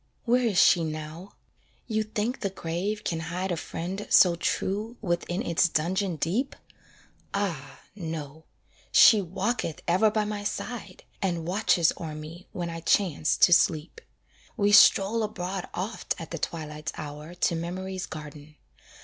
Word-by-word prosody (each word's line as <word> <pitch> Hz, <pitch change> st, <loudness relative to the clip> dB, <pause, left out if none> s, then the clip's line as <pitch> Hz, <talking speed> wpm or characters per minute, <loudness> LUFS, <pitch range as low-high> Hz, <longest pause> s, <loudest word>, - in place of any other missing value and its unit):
Where 245 Hz, 0 st, +3 dB
is 200 Hz, -5 st, -1 dB
she 175 Hz, -1 st, +6 dB
now? 155 Hz, +4 st, -6 dB, 0.5 s
you 220 Hz, -2 st, 0 dB
think 215 Hz, +3 st, -2 dB
the 195 Hz, -, -1 dB
grave 190 Hz, +4 st, -3 dB
can 165 Hz, -, -2 dB
hide 180 Hz, +3 st, -3 dB
A -, -, +1 dB
friend 185 Hz, +5 st, -5 dB
so 175 Hz, -2 st, +6 dB
true 210 Hz, +6 st, -2 dB
within 175 Hz, +1 st, -2 dB
its 170 Hz, +1 st, +2 dB
dungeon 180 Hz, +4 st, 0 dB
deep? 205 Hz, -, -1 dB, 0.8 s
Ah! 165 Hz, -9 st, -3 dB
no; 160 Hz, -4 st, -6 dB, 0.5 s
she 215 Hz, -3 st, +8 dB
walketh 190 Hz, -1 st, -2 dB
ever 185 Hz, +6 st, +4 dB
by 215 Hz, 0 st, 0 dB
my 210 Hz, -1 st, -4 dB
side, 205 Hz, -2 st, -5 dB, 0.2 s
And 175 Hz, -4 st, -1 dB
watches 180 Hz, -2 st, +2 dB
o'er 155 Hz, -2 st, -5 dB
me 155 Hz, +4 st, -9 dB
when 175 Hz, -2 st, -4 dB
I 165 Hz, -, -5 dB
chance 165 Hz, -3 st, +1 dB
to 175 Hz, -, +4 dB
sleep. 160 Hz, -2 st, +2 dB, 0.6 s
We 205 Hz, -2 st, +3 dB
stroll 205 Hz, +2 st, +6 dB
abroad 190 Hz, -3 st, -4 dB
oft 195 Hz, +1 st, -3 dB
at 165 Hz, -, -8 dB
the 165 Hz, -, -4 dB
twilight's 155 Hz, -1 st, -5 dB
hour 150 Hz, +3 st, -8 dB
To 175 Hz, -1 st, +1 dB
memory's 185 Hz, +3 st, -4 dB
garden. 150 Hz, -1 st, -10 dB
180 Hz, 145 wpm, -27 LUFS, 165-205 Hz, 0.8 s, she